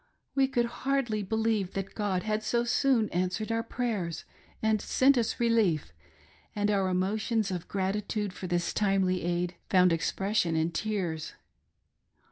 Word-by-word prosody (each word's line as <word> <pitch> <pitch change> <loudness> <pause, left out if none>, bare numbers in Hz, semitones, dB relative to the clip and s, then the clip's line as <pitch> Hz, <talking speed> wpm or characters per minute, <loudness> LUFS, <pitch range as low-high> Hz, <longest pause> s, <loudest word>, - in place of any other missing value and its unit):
We 270 -1 +3
could 240 -3 +1 0.2
hardly 265 -6 0
believe 220 -1 0
that 195 0 -4
God 200 -4 -1
had 215 0 -1
so 235 +2 +1
soon 240 -2 +2
answered 185 +5 -1
our 225 0 +1
prayers 220 -9 -3 0.3
and 220 -1 +1
sent 275 +2 +4
us 235 -3 0
relief, 215 - +2 0.6
and 205 0 +1
our 195 -2 +1
emotions 205 +3 0
of 180 -2 -4
gratitude 200 +1 -2
for 185 - -6
this 175 0 0
timely 195 -3 +1
aid, 175 +1 -1
found 180 -2 +5
expression 180 +1 0
in 160 +1 +1
tears. 180 -6 -2
205 Hz, 140 wpm, -29 LUFS, 180-225 Hz, 0.6 s, found